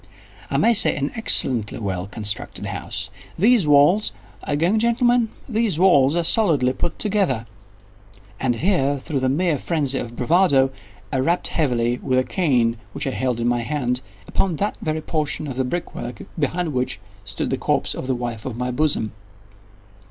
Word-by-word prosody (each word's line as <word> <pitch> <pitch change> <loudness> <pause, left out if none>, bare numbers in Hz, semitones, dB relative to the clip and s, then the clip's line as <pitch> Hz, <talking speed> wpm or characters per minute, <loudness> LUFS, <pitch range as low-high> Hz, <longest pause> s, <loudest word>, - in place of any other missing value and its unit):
—"I - - 0
may 235 - +4
say 220 - +6
an 140 0 -2
excellently 125 - +3
well 95 -3 -3
constructed 105 0 -3
house. - - -4 0.3
These 215 -2 +4
walls—are 150 +2 +2
you - - +1
going, 185 +7 +2
gentlemen?—these 235 - +1
walls 160 -6 +4
are 170 - +1
solidly 160 - +2
put 170 +4 -3
together;" 190 - 0 0.9
and 125 -2 0
here, 145 - +1
through 135 +1 -3
the 130 0 +1
mere 155 +1 +1
phrenzy 140 -5 -1
of 120 0 -6
bravado, 135 -1 +3 0.4
I 135 - +1
rapped 170 +7 +1
heavily, 120 -5 0
with 130 - 0
a 130 - +3
cane 125 -9 +1 0.2
which 140 - -4
I 135 - -1
held 125 -2 -1
in 120 - 0
my 120 0 +1
hand, 125 -1 -1 0.3
upon 185 -4 0
that 205 +7 -1
very 155 0 -2
portion 155 -1 -2
of 135 -4 -5
the 130 - 0
brick 170 +7 -4
work 120 -2 -7 0.2
behind 160 +2 -1
which 125 0 -2 0.2
stood 100 0 -3
the - - 0
corpse - - 0
of 130 - -6
the 130 - 0
wife 120 -3 -5
of 120 -3 -5
my 125 0 -2
bosom. 125 -5 +1
140 Hz, 170 wpm, -22 LUFS, 125-175 Hz, 0.9 s, say